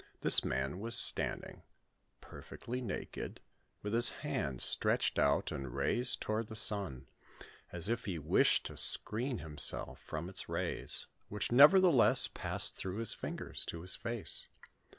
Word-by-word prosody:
This - - +6
man 65 +7 -3
was 115 +3 -3
standing, - - +2 0.6
perfectly 125 +2 -9
naked, 115 -5 -7 0.4
with 105 +1 -5
his 120 +1 +3 0.2
hands 65 -3 -3
stretched - - 0
out - - +1
and 65 -3 -7
raised 125 +1 +2
toward 110 +1 -3
the 110 - -10
sun, 95 - -2 0.6
as 90 +1 -4
if 115 +1 -3
he 95 -4 -4
wished 75 0 +1
to - - -8
screen 120 +3 0
him 75 -5 -10
self - - 0
from 80 +2 -7
its 95 - -7
rays, - - -4 0.2
which 105 +2 -4
nevertheless 145 - +6
passed - - 0
through 95 +1 -6
his 115 -1 +5
fingers - - -5
to 85 - -7
his 90 +2 +1
face. 115 -2 -5
105 Hz, 145 wpm, -32 LUFS, 80-115 Hz, 0.6 s, This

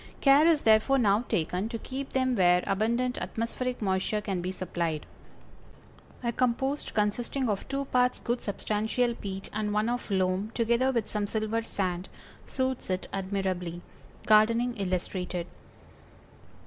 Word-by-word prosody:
Care 280 +3 +6
is 325 -3 +3
therefore 220 +5 +5
now 215 -1 +3
taken 180 +5 0
to 230 - -3
keep 270 +4 -6
them 260 -1 +1
where 180 -3 +4
abundant 235 +5 0
atmospheric 245 +1 -3
moisture 190 +2 0
can 195 -3 -3
be 180 +1 -2
supplied. 170 -4 -3 1.2
A 235 - +1
compost 260 +4 -1
consisting 235 +5 0
of 205 -3 -2
two 275 0 -2
parts 250 -1 +2
good 240 0 -1
substantial 220 +4 0
peat 195 -3 -6
and 210 -1 -1
one 215 +2 +2
of 245 -1 -3
loam, 190 +1 +1
together 235 +3 +2
with 235 -4 -1
some 210 -1 -2
silver 220 +1 -1
sand, 185 -5 -3 0.4
suits 260 -4 -2
it 185 0 -1
admirably. 185 -3 -2 0.4
_Gardening 230 +3 +4
Illustrated. 180 -2 -2
215 Hz, 135 wpm, -28 LUFS, 190-245 Hz, 1.2 s, Care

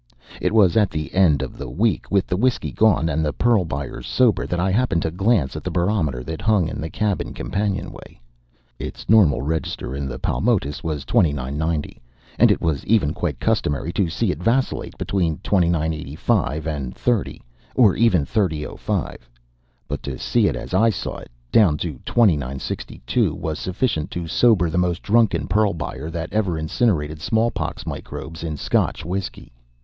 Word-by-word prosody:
It - - +1
was 105 -6 +4
at 105 -3 +4
the 75 -1 -5
end 80 -8 +4
of 65 - -8
the - - -5
week, 110 +4 0
with 100 -2 +2
the 90 - -1
whiskey 125 +6 0
gone, 105 -7 +3
and 80 0 0
the 75 - 0
pearl 115 +1 +2
buyers 70 -3 -5
sober, 125 -5 +2
that 90 - -2
I 95 +2 +1
happened 100 -5 +1
to 80 - -1
glance 90 - +1
at 75 - -6
the - - -2
barometer 85 -7 0
that 80 +4 -6
hung 105 -7 +2
in 80 - -5
the 80 - -4
cabin 105 +3 -2
companionway. 100 -1 -4 0.6
Its - - -7
normal 95 - +5
register 75 -3 -3
in 70 0 -3
the 65 -1 -5
Paumotus 95 - 0
was 75 -4 -3
29.90, 75 +2 0 0.4
and - - +7
it - - +2
was 80 -4 0 0.3
quite - - -3
customary 75 +4 0
to 95 -5 +1
see 100 +4 0
it - - -6
vacillate 125 +4 0
between 85 -6 0
29.85 80 -4 0
and 70 -5 -4
30.00, 120 -6 -1 0.4
or 110 -7 +5
even 95 -11 +3
30.05; 80 -8 -2 0.7
but - - -4
to - - -5
see - - +2
it - - 0
as - - -7
I 110 +5 +4
saw 100 - -3
it, - - -11 0.2
down 90 -9 +5
to 75 -6 -4
29.62, 70 - 0
was 80 -2 -4
sufficient 95 - -1
to 85 -1 -4
sober 105 -2 +4
the 80 +2 0
most 90 -1 0
drunken 105 -8 +2
pearl 100 +1 +2
buyer 75 -1 -5
that 85 0 -5
ever 100 -6 0
incinerated 80 -3 0
smallpox 110 -6 -1
microbes 80 +1 -7
in 80 -3 -3
Scotch - - 0
whiskey. 95 +2 -5
85 Hz, 165 wpm, -22 LUFS, 75-105 Hz, 0.7 s, and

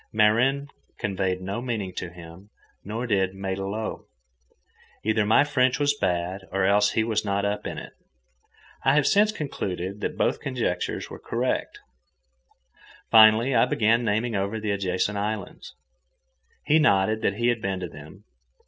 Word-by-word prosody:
Marin 120 +7 +3 0.3
conveyed 95 -2 -2
no 100 +5 -4
meaning 110 -7 -3
to 90 - -5
him; 85 +3 -13 0.3
nor 110 +5 -4
did 95 -4 0
matelot. 95 +3 -4 1.0
Either 110 0 +1
my 110 - +5
French 130 -3 +1
was 145 0 +3
bad, 90 -5 -1
or 95 0 +1
else 100 +1 +3
he 110 - +2
was 110 -1 0
not 100 -1 -1
up 105 +1 -2
in - - -6
it. - - -9 0.9
I 135 - +4
have 150 -2 +3
since 210 +1 +4
concluded 100 - -4
that - - -3
both - - +1
conjectures 120 -9 -3
were - - -8
correct. - - -2 1.3
Finally, 110 +3 +7
I 115 0 +5
began 115 0 +2
naming 110 +1 0
over 100 +3 -2
the 105 -1 -2
adjacent 100 +1 -1
islands. 105 +2 -5 0.9
He 155 +1 +4
nodded 110 -5 +3
that 100 - 0
he 120 +2 +1
had 120 -2 0
been 95 -2 -2
to 90 - -3
them. 80 +6 -13
105 Hz, 150 wpm, -25 LUFS, 95-115 Hz, 1.3 s, Finally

